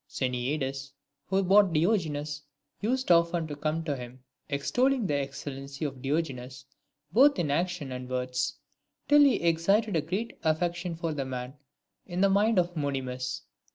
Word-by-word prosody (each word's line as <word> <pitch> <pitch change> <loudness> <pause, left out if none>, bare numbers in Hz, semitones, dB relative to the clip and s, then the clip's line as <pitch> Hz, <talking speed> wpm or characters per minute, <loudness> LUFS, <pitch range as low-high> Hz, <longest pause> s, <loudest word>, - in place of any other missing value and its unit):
Xeniades, 135 +1 -2 0.3
who 195 +1 +2
bought 195 -1 +5
Diogenes, 155 -4 0 0.4
used 255 0 0
often 170 0 +4
to 150 -2 -6
come 155 +2 -2
to 150 -3 -1
him, 125 0 -9 0.3
extolling 245 - +1
the 150 - 0
excellency 140 +1 -4
of 135 -3 -5
Diogenes 135 -3 -3 0.5
both 275 +7 +6
in 160 -5 0
actions 170 -3 -1
and 125 0 -6
words, 125 +1 -1 0.5
till 295 0 +6
he 280 -3 +6
excited 175 +5 +2
a 160 - +3
great 190 +9 -4
affection 175 +2 0
for 165 -1 -3
the 140 -2 -2
man 125 -1 -5 0.5
in 175 0 -4
the 195 0 +5
mind 210 +2 +3
of 175 0 +1
Monimus. 130 -3 -3
155 Hz, 150 wpm, -28 LUFS, 135-180 Hz, 0.5 s, both